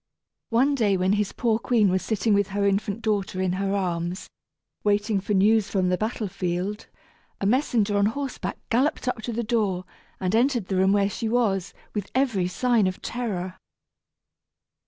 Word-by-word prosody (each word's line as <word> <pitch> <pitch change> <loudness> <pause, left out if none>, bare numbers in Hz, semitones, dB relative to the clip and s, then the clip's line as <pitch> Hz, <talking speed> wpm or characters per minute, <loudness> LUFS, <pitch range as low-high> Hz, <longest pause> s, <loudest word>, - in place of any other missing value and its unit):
One 260 +5 +3
day 210 -7 +2
when 185 +2 +2
his 210 -1 0
poor 230 -2 0
queen 230 -4 +3
was 185 0 +1
sitting 220 0 0
with 200 -1 +3
her 200 0 -1
infant 200 +2 0
daughter 205 -3 -1
in 185 -1 +1
her 195 +1 -1
arms, 175 -1 -2 0.5
waiting 205 0 +1
for 205 +1 -1
news 210 +1 +4
from 185 -3 +1
the 180 - +2
battle 215 0 -2
field, 185 +2 -3 0.5
a - - -2
messenger 220 -3 +2
on 200 0 +3
horseback 275 +4 -4
galloped 255 +3 +1
up 250 -3 -1
to 235 - -4
the 235 +1 -2
door, 210 -6 0 0.3
and 185 +1 -1
entered 240 -4 +2
the 195 - 0
room 190 +1 +3
where 200 -1 +3
she 220 +3 -3
was, 205 -6 0 0.2
with 205 -2 -3
every 240 -9 +2
sign 230 +1 +2
of 185 - -3
terror. 190 -7 -4
205 Hz, 175 wpm, -25 LUFS, 190-230 Hz, 0.5 s, news